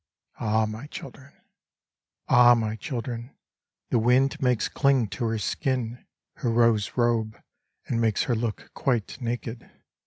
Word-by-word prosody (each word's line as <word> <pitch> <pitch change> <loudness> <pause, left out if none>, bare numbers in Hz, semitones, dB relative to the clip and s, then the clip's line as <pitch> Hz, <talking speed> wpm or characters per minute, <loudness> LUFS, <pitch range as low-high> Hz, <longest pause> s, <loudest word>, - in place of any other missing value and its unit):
Ah 110 0 +2
I - - +2
my 110 +6 -6
children 140 -1 -10 1.0
I - - -1
Ah 120 0 +8
I - - +4
my 110 -2 -1
children 120 -1 -5
I - - -35 0.5
the 120 - +3
wind 130 +6 +3
makes 125 -4 +2
cling 135 -6 +2
to 115 +4 -3
her 115 0 0
skin 125 +2 -2 0.3
Her 125 - -1
rose 115 -3 +2
robe, 115 -2 +1 0.5
and 115 - -1
makes 110 -2 +2
her 125 - 0
look 115 -1 -3
quite 125 0 -1
naked. 120 0 -4
120 Hz, 155 wpm, -26 LUFS, 110-125 Hz, 1.0 s, Ah